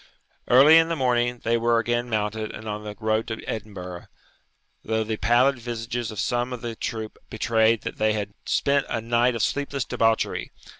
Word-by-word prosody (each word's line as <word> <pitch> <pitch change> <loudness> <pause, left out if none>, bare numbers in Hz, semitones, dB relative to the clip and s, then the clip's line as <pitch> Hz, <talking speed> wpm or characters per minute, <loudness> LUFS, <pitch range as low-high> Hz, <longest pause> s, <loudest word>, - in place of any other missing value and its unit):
Early 145 +6 +8
in 165 0 +2
the 165 - 0
morning 120 -3 +1
they 115 +1 +2
were 115 0 +2
again 120 +1 0
mounted 110 0 -2
and 110 - -9
on 105 0 -4
the 105 -1 -7
road 110 0 0
to 110 -1 -6
Edinburgh, 95 -5 -6 0.8
though 110 0 0
the 110 0 -3
pallid 125 +4 +3
visages 120 0 -4
of 110 - -6
some 120 +5 0
of 125 -2 -5
the 115 -1 -4
troop 110 -1 -5
betrayed 110 0 +2
that - - -5
they 110 0 +2
had 105 -1 -4
spent 140 0 +1
a - - -1
night 120 +2 +1
of 115 - -1
sleepless 140 -2 -1
debauchery. 115 0 0
115 Hz, 185 wpm, -24 LUFS, 110-120 Hz, 0.8 s, Early